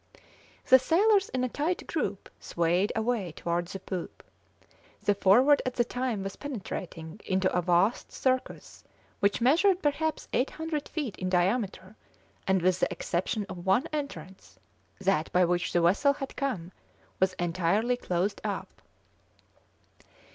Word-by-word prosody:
The 260 - +7
sailors 390 - +3
in 255 -1 -1
a - - +2
tight 320 +8 -2
group 205 - -3
swayed 175 +4 0
away 220 -6 -1
towards 170 +1 -2
the 195 - -5
poop. 185 -2 -6 0.8
The 205 - +3
Forward 245 +9 +5
at 255 - -3
the 240 - +3
time 245 -4 -2
was 195 0 -6
penetrating 190 - -6
into 185 -1 0
a 180 - +3
vast 180 +6 +1
circus, 260 -1 -2 0.4
which 200 +3 +1
measured 350 +9 +4
perhaps 310 +2 -1
800 305 +3 -2
feet 290 - -3
in 185 - -2
diameter, 190 +2 0 0.5
and 190 -2 +2
with 185 0 +2
the - - +1
exception 195 +4 -2
of 175 -2 -8
one 215 +10 +3
entrance 190 - -6 0.4
that 190 -5 0
by 180 0 +4
which 175 0 0
the 175 - +2
vessel 205 +12 +4
had 275 -1 -7
come 210 -12 -3 0.5
was 190 0 +2
entirely 185 +7 +1
closed 185 -3 -2
up. - - -5
200 Hz, 140 wpm, -28 LUFS, 180-260 Hz, 0.8 s, The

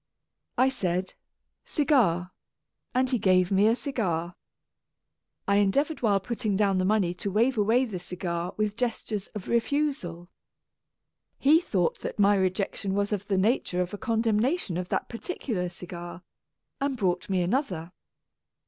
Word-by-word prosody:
I 260 +1 +5
said 185 -7 -2 0.5
"cigar," 215 - +2 0.6
and 255 +1 +3
he 250 - +2
gave 185 -2 +3
me 200 +2 +4
a 225 - +4
cigar. 185 - -2 1.1
I 200 0 +4
endeavoured 275 +10 +1
while 205 -4 +3
putting 215 0 -2
down 195 -2 +2
the 185 - +1
money 195 -4 +2
to 190 +3 -4
wave 230 +7 +2
away 225 +4 +3
the 200 -7 -5
cigar 175 -1 -3
with 210 -1 0
gestures 225 -4 -2
of 205 - -6
refusal. 235 - -1 1.1
He 310 +5 +5
thought 185 - 0
that - - -5
my 205 0 +5
rejection 195 0 -1
was 205 +1 0
of 205 0 -3
the 195 - +1
nature 190 -2 +1
of 180 - -8
a - - -3
con 230 -3 0
demnation 225 - +1
of 180 0 -5
that - - -1
particular 230 - -3
cigar, 175 0 -8 0.6
and 275 -1 -1
brought 180 -4 0
me 185 -2 +2
another. 180 - -1
200 Hz, 150 wpm, -27 LUFS, 180-240 Hz, 1.1 s, I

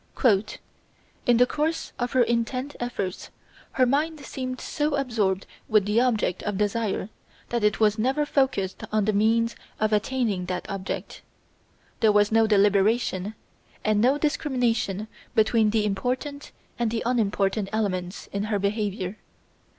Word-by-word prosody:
"In 240 -1 +5
the 250 - +6
course 310 +4 -2
of 245 0 -2
her 255 -2 +5
intent 240 +4 -1
efforts 200 -6 -4 0.4
her 255 - +4
mind 300 +5 0
seemed 255 -2 -5
so 295 -1 -1
absorbed 220 -8 0 0.2
with 215 -2 +4
the 210 +3 +3
object 220 -7 +1
of 210 -2 -2
desire 210 0 -1 0.4
that 235 -2 -1
it 210 -1 +2
was 215 0 +3
never 270 +6 +1
focussed 265 -10 0
on 215 -1 +2
the 215 - +1
means 230 +3 +2 0.2
of 215 0 +1
attaining 210 -4 0
that 180 -1 -3
object. 195 -2 -5 0.8
There 220 -2 +5
was 205 0 +3
no 225 0 +4
deliberation, 205 0 +2 0.5
and 215 -1 +3
no 260 +5 +4
discrimination 245 -9 0 0.3
between 220 0 +4
the 215 0 +1
important 250 +8 -3 0.3
and 235 -2 +1
the 225 0 -2
unimportant 205 -4 +1
elements 185 -4 -2
in 200 +1 -2
her 215 -1 0
behaviour. 200 -1 -2
220 Hz, 140 wpm, -25 LUFS, 205-250 Hz, 0.8 s, the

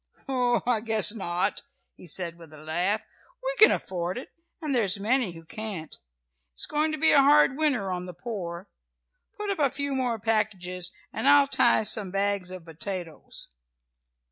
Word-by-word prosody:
"Oh, 250 -3 +1
I 245 -2 +2
guess 220 -1 +4
not," 190 -2 -1 0.3
he - - -14
said 170 +1 -4
with 165 -3 -13
a - - -12
laugh, 175 +7 0 0.4
"We - - 0
can 435 - +10
afford 180 +1 -2
it, 250 - -8 0.3
and 305 -4 -3
there's 205 -6 +2
many 225 -2 +1
who 165 -1 -12
can't. 195 -5 -6 0.6
It's - - -1
going 305 +1 0
to - - -2
be 320 +2 +4
a 285 - +6
hard 285 -1 +5
winter 275 -11 0
on 180 0 -4
the 180 - -8
poor. 175 -3 -6 0.7
Put 420 -1 -3
up 390 - -3
a 285 -2 +3
few 280 +1 -3
more 250 -3 -1
packages, 195 -5 -2 0.2
and 235 +5 -2
I'll 285 0 +7
tie 240 -3 +3
up - - -4
some 205 -2 +1
bags 195 -1 -1
of 185 -2 -8
potatoes!" 165 - -7
210 Hz, 175 wpm, -26 LUFS, 180-260 Hz, 0.7 s, can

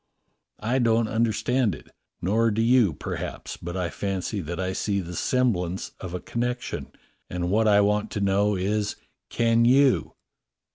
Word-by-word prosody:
^ - - -6
I 125 +4 +2
don't 115 -2 +3
understand 115 -1 +1
it, - - -15 0.3
nor 110 +5 +2
do 110 +1 0
you, 120 -5 +4
perhaps, - - -5
but 85 +2 -6
I 90 -2 -2
fancy 100 +1 -3
that 85 +2 -5
I 95 0 -1
see 100 +1 -1
the 90 -1 -6
semblance 95 -7 0
of 90 -2 -6
a - - -3
con 120 - -4
nection, 125 0 -3 0.4
and 90 0 -2
what 110 +2 +3
I 105 -1 +6
want 105 +1 +1
to - - -2
know 100 +1 +2
is, 105 +3 -1 0.3
can 115 0 +2
you. 130 - +4
105 Hz, 165 wpm, -25 LUFS, 95-115 Hz, 0.4 s, I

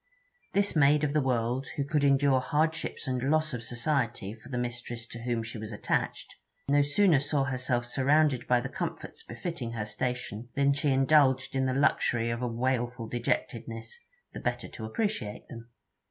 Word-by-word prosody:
This 200 -1 +2
maid 150 0 +5
of 145 -1 +1
the 150 - +3
world, 125 0 0
who 140 - 0
could 145 +1 0
endure 140 -1 +4
hardships 160 +2 -1
and 130 -1 -1
loss 155 +2 +2
of 120 - -3
society 120 -4 -1
for 115 +3 -14
the 130 - -3
mistress 120 -1 -4
to 115 0 -9
whom 120 -1 -1
she 115 0 -7
was 110 +1 -6
attached, 105 - -2 0.3
no 145 +1 +4
sooner 150 +2 +4
saw 145 0 0
herself 130 -2 -1
surrounded 140 +1 +2
by 125 -1 +4
the - - -3
comforts - - -5
befitting 120 -2 -5
her 110 -2 -3
station, 125 0 -4
than 140 0 +3
she 145 +1 0
indulged 135 -1 +4
in 130 0 +2
the 130 - 0
luxury 120 -4 +2
of 115 +1 -3
a 125 - 0
wailful 120 -1 -1
dejectedness, 115 -1 -3 0.3
the - - -6
better - - -2
to 110 - -7
appreciate 155 - -3
them. 115 0 -10
130 Hz, 175 wpm, -29 LUFS, 120-145 Hz, 0.3 s, maid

